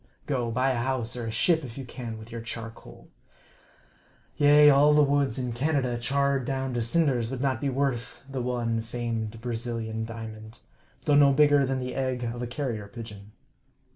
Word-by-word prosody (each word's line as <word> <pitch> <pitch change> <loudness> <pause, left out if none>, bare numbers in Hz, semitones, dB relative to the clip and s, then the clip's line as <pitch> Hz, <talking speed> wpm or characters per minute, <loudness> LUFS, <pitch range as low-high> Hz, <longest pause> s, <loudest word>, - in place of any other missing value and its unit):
Go, 125 -5 -1
buy 130 +3 +1
a 130 - -1
house, 120 -1 -1
or 120 -2 -4
a - - -3
ship, 160 +7 +2
if 120 -2 -8
you 135 - -6
can, 120 -2 -7
with 110 +2 -12
your 115 0 -5
charcoal! 115 -1 -8 1.3
Yea, 145 0 +6
all 145 +2 +5
the 150 - +6
woods 140 -3 +1
in 125 -2 -2
Canada 130 -1 0
charred 140 +2 +1
down 135 0 -2
to 120 - -1
cinders 120 -2 +1
would 135 -1 -4
not 130 -4 0
be 140 - 0
worth 135 -3 -2
the 135 -2 -4
one 120 -2 -1
famed 115 -1 -4
Brazilian 115 -2 -3
diamond, 110 0 -8 0.5
though 145 - +3
no 145 -1 +6
bigger 145 -1 +5
than 135 0 0
the 125 0 -4
egg 130 -2 -2
of 120 +1 -4
a 120 - -3
carrier 120 -5 -4
pigeon. 105 -2 -10
125 Hz, 180 wpm, -27 LUFS, 115-135 Hz, 1.3 s, Yea